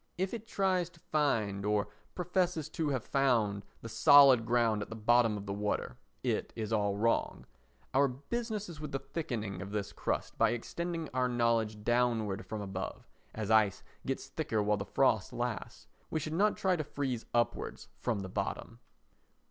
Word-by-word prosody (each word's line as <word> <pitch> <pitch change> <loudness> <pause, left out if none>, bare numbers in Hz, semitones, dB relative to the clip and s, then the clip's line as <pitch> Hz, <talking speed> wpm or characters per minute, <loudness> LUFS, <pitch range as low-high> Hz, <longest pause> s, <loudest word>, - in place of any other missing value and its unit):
If 190 +3 -1
it 225 -1 -6
tries 185 -4 +1
to 175 -2 -21
find, 115 -12 0
or 105 0 +1 0.3
professes 180 -3 0
to 160 -2 -1
have 130 -5 -1
found, 115 -7 +1 0.2
the - - -5
solid 130 -1 +7
ground 115 -3 +2
at - - -5
the 115 - -6
bottom 115 0 +3
of 100 - -7
the 100 - -3
water, 105 +1 -2 0.3
it - - -1
is 110 0 -3
all 100 -2 +1
wrong. 115 +2 0 0.5
Our 140 +1 +5
business 210 - -4
is 170 -3 -9
with 150 -2 -6
the - - +1
thickening 120 - -4
of 95 - -6
this 100 -1 -3
crust - - -3
by - - +4
extending 165 +7 -3
our 130 -1 +2
knowledge 115 -3 +1
downward 115 -3 +1
from 110 -1 -4
above, 95 -2 -5 0.3
as 110 -1 -2
ice 110 -3 +4 0.2
gets - - -3
thicker 110 -2 -1
while 105 0 +2
the 100 - -4
frost - - +2
lasts; - - -4 0.2
we 160 - -1
should 155 +1 -4
not 205 +5 +3
try 190 -1 +2
to 155 - -2
freeze 135 -5 -3
upwards 120 0 -1
from 110 -5 -1
the 95 - -5
bottom. 95 - -4
120 Hz, 175 wpm, -32 LUFS, 105-155 Hz, 0.5 s, solid